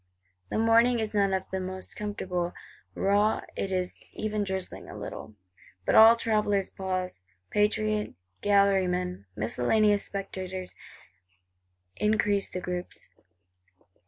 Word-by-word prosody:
The -, -, -2 dB
morning 230 Hz, +2 st, +4 dB
is 220 Hz, -1 st, -2 dB
none 200 Hz, -2 st, +3 dB
of 190 Hz, 0 st, -1 dB
the 190 Hz, -, -1 dB, 0.4 s
comfortablest: 180 Hz, -4 st, -3 dB, 0.4 s
raw; 205 Hz, +2 st, +2 dB
it 195 Hz, -, -3 dB
is 185 Hz, -1 st, -2 dB
even 215 Hz, -1 st, -2 dB
drizzling 190 Hz, -1 st, -4 dB
a -, -, -8 dB
little. 110 Hz, -, -7 dB, 0.5 s
But -, -, +2 dB
all 225 Hz, +1 st, +9 dB
travellers 210 Hz, -4 st, +1 dB
pause; 185 Hz, -, -3 dB, 0.3 s
patriot 210 Hz, 0 st, +1 dB, 0.3 s
gallery 200 Hz, -2 st, +4 dB
men, 180 Hz, -, -3 dB
miscellaneous 200 Hz, -, +2 dB
spectators 190 Hz, -2 st, -5 dB, 1.2 s
increase 210 Hz, -2 st, +1 dB
the 180 Hz, -, -5 dB
groups. 180 Hz, 0 st, -5 dB
200 Hz, 110 wpm, -28 LUFS, 185-210 Hz, 1.2 s, all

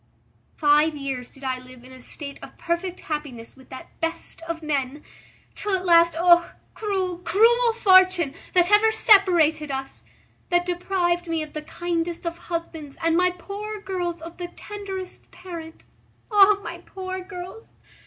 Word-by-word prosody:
Five 300 Hz, +1 st, +3 dB
years 270 Hz, -3 st, -5 dB
did 275 Hz, -, -15 dB
I 260 Hz, -1 st, -2 dB
live 255 Hz, -1 st, -14 dB
in 255 Hz, -, -14 dB
a 260 Hz, 0 st, -13 dB
state 280 Hz, +2 st, -7 dB
of -, -, -12 dB
perfect 345 Hz, +2 st, -3 dB
happiness 285 Hz, -7 st, -6 dB
with 265 Hz, -1 st, -18 dB
that 260 Hz, -, -12 dB
best 330 Hz, 0 st, -4 dB
of 330 Hz, -1 st, -4 dB
men, 290 Hz, -1 st, -2 dB, 0.5 s
till 410 Hz, -2 st, -1 dB
at 370 Hz, 0 st, -3 dB
last 335 Hz, -1 st, +5 dB
Oh! 345 Hz, 0 st, +5 dB, 0.2 s
cruel! 380 Hz, -4 st, -2 dB
cruel 465 Hz, +6 st, +4 dB
fortune, 370 Hz, -8 st, +5 dB, 0.2 s
that 355 Hz, 0 st, +4 dB
ever 430 Hz, +2 st, +6 dB
separated 345 Hz, -8 st, +4 dB
us, 270 Hz, 0 st, -5 dB, 0.5 s
that 350 Hz, 0 st, +2 dB
deprived 350 Hz, -1 st, -1 dB
me 325 Hz, -1 st, -1 dB
of 305 Hz, -, -11 dB
the 305 Hz, -, -4 dB
kindest 340 Hz, +2 st, -3 dB
of 335 Hz, 0 st, -2 dB
husbands 325 Hz, -4 st, -5 dB
and 330 Hz, 0 st, +3 dB
my 360 Hz, +1 st, +4 dB
poor 405 Hz, +4 st, -7 dB
girls 350 Hz, -4 st, -4 dB
of 335 Hz, +1 st, -9 dB
the 355 Hz, -1 st, -5 dB
tenderest 385 Hz, 0 st, -8 dB
parent. 330 Hz, -3 st, -10 dB, 0.5 s
O 410 Hz, 0 st, +6 dB
my 340 Hz, 0 st, -6 dB
poor 375 Hz, +1 st, -6 dB
girls! 370 Hz, +3 st, -10 dB
345 Hz, 155 wpm, -24 LUFS, 305-375 Hz, 0.5 s, ever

